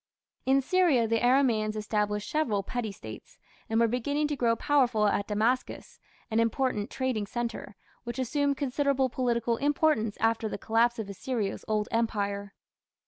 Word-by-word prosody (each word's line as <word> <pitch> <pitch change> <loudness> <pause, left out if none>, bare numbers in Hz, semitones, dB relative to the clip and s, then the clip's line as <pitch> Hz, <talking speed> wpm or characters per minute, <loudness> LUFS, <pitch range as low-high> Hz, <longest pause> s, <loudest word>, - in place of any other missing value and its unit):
In 270 +1 +4
Syria 310 -8 +3
the 225 0 +1
Aramaeans 240 -4 +3
established 210 -1 -1
several 245 -11 0
petty 230 0 -3
States, 110 - -11 0.3
and 225 0 +2
were 230 - +4
beginning 285 +6 0
to 295 - -1
grow 235 -3 +2
powerful 245 -4 +2
at 205 -1 +1
Damascus, 225 +5 -1 0.3
an 220 - +2
important 230 -2 0
trading 255 -6 -2
centre, 235 -2 -4 0.3
which 240 +1 -6
assumed 280 +2 0
considerable 275 -1 +1
political 235 -2 0
importance 285 -6 +1
after 225 0 +1
the - - -4
collapse 235 +2 +2
of 220 -3 -4
Assyria's 205 +1 -3
Old 215 -1 0
Empire. 205 -3 -1
230 Hz, 145 wpm, -28 LUFS, 215-260 Hz, 0.3 s, In